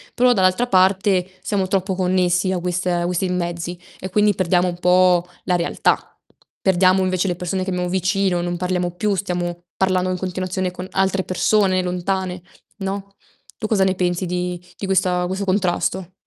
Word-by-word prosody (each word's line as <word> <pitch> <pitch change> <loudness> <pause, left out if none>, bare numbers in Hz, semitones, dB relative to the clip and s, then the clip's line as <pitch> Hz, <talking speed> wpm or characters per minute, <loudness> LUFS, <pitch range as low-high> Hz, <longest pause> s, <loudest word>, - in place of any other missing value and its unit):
Però 250 0 +4
dall'altra 190 +4 +2
parte, 190 -1 +3
siamo 195 -3 -1
troppo 190 0 0
connessi 185 0 +1
a 180 - -1
queste 180 0 -1
questi 180 +1 -1
mezzi, 175 -1 -3 0.2
e 185 - -5
quindi 210 +2 +3
perdiamo 180 -1 +2
un 175 0 -4
po' 180 -1 +4 0.2
la 180 - +2
realtà. 170 0 +1 0.6
Perdiamo 185 0 +4
invece 185 +1 0
le 175 - 0
persone 185 +2 -2
che 190 - -4
abbiamo 180 -1 -1
vicino, 185 -1 +1
non 175 0 -2
parliamo 180 -1 -1
più, 205 +3 -1
stiamo 175 -2 -3
parlando 185 -1 +1
in 185 - -1
continuazione 185 0 -2
con 180 +1 -7
altre 190 0 +1
persone 185 0 +2
lontane, 180 0 -2 0.4
no, 195 0 -5 0.5
tu 215 - -2
cosa 205 -3 +2
ne 190 0 +2
pensi 180 0 0
di 180 0 -2 0.2
di 200 - -4
questa 180 -2 +1
questo 190 +2 -3
contrasto? 185 -1 0
185 Hz, 165 wpm, -21 LUFS, 180-190 Hz, 0.6 s, Però